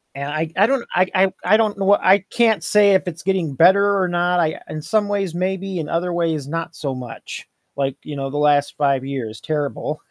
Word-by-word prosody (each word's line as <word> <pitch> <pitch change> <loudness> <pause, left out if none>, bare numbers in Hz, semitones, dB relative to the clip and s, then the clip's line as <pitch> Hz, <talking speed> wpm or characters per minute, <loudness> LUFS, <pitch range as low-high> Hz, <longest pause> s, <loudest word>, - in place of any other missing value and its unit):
And 140 +1 -5
I 155 +2 -2
I 200 - +5
don't 260 0 0
I 185 +1 +3
I 190 0 +2
I 210 +4 +4
don't 215 -2 0
know 195 - -2
what 205 +1 +5
I 190 +2 +5
can't 225 -3 +2
say 205 -1 +4
if 190 - +2
it's 170 -2 -6
getting 185 -6 -1
better 200 +6 +4
or 185 - +1
not, 175 0 +1
I 160 -2 -1
in 155 - -5
some 205 +6 0
ways, 195 -4 -2
maybe. 190 +1 -2
In 155 -3 -4
other 175 +1 -1
ways, 165 -5 -1
not 165 +2 -4
so 140 -5 -4
much. 125 -2 -8 0.3
Like, 135 -1 -2
you 150 - -7
know, 135 -1 -4
the 145 - -5
last 145 -1 +2
5 140 -3 +1
years, 120 -6 -5
terrible. 150 0 -3
170 Hz, 225 wpm, -20 LUFS, 145-195 Hz, 0.3 s, I